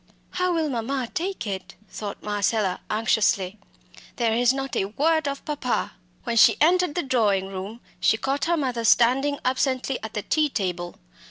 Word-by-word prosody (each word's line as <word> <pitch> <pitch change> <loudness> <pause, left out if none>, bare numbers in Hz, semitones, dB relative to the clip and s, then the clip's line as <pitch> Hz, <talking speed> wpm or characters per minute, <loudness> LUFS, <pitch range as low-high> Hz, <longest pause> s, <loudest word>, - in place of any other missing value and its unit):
"How 365 0 0
will 325 -2 0
mamma 250 -1 -2
take 360 -6 -3
it?" 190 -3 -5
thought 205 0 -7
Marcella 205 -2 0
anxiously. 210 -2 +1 0.6
"There 230 -2 +1
is 245 +2 +4
not 270 0 -4
a - - +1
word 305 +8 +1
of 280 0 -4
papa!" 285 -5 -2 0.3
When 235 -1 -2
she - - +7
entered 355 +1 +3
the 350 - 0
drawing 210 -8 +1
room, 195 +5 -7 0.2
she 220 - +3
caught 270 +5 -1
her 340 0 +1
mother 250 -5 -2
standing 260 +5 +3
absently 260 0 0
at 220 0 -7
the 210 - -2
tea 305 -1 +1
table. 180 -7 -3
245 Hz, 165 wpm, -24 LUFS, 210-285 Hz, 0.6 s, she